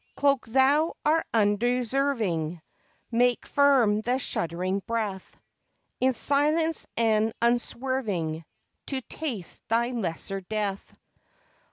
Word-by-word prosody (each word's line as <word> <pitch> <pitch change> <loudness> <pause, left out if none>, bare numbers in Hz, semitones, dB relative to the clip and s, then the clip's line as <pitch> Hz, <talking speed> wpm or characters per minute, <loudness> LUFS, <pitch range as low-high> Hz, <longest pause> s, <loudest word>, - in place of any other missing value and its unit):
Cloak 280 -4 +2
Thou 275 +7 +3
our 315 +2 +3
undeserving, 225 - 0 0.5
Make 245 +1 +2
firm 260 -7 +3
the 245 +3 0
shuddering 185 -4 -2
breath, 215 -5 -3 0.6
In 260 0 +3
silence 305 +5 +2
and 220 -1 +2
unswerving 235 -8 -1 0.4
To 270 -2 -2
taste 240 - -5
thy 235 +2 +1
lesser 195 -3 -3
death! 200 0 -3
235 Hz, 90 wpm, -27 LUFS, 205-265 Hz, 0.6 s, Thou